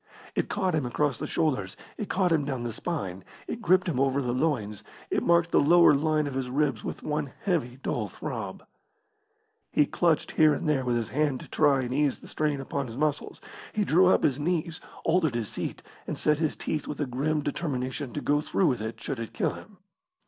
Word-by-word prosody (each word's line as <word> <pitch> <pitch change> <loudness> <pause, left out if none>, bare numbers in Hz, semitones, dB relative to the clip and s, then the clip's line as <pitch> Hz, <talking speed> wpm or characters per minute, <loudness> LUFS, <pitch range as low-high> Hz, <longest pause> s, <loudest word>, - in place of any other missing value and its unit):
It - - -1
caught 190 -4 0
him 150 -5 0
across 140 +1 0
the - - -3
shoulders, 115 -12 0 0.2
it 210 - -5
caught 185 -2 +2
him 160 -3 +3
down 135 -4 -3
the 120 -1 -3
spine, 95 - -4 0.2
it 230 - -4
gripped 185 -2 +3
him 150 -7 0
over 135 0 +2
the 125 -3 -1
loins, 125 -8 -1 0.3
it - - +2
marked 170 0 +3
the - - +5
lower 170 +2 +6
line 155 +1 +2
of 140 - -4
his 130 -1 -2
ribs 135 -4 0
with - - -5
one 150 -2 -2
heavy, 150 - 0
dull - - -1
throb. - - -6 1.1
He 150 - +4
clutched 165 +1 +1
here 155 -1 +5
and - - -3
there 145 -3 +2
with 120 -1 +1
his 115 -2 -1
hand 145 -2 0
to - - -10
try 145 -3 +3
and 125 0 -3
ease 145 -1 +2
the - - -14
strain 150 -2 -1
upon 135 0 -3
his 115 +1 -8
muscles. 150 0 -1 0.3
He 210 -1 +1
drew 180 +3 +5
up 185 - +4
his 135 -1 +2
knees, 165 +1 -1 0.2
altered 165 -6 +2
his 115 -3 -2
seat, - - -5 0.2
and - - -3
set 150 -1 +2
his 155 -2 0
teeth 155 - -3
with 150 - -5
a 145 - +1
grim 145 +5 0
determination 135 -3 -3
to 145 - -3
go 145 +1 +2
through 190 - +1
with 125 -8 +1
it 110 +1 -5
should 135 - -4
it 115 - -6
kill - - 0
him. 210 -2 -12
145 Hz, 215 wpm, -27 LUFS, 130-160 Hz, 1.1 s, lower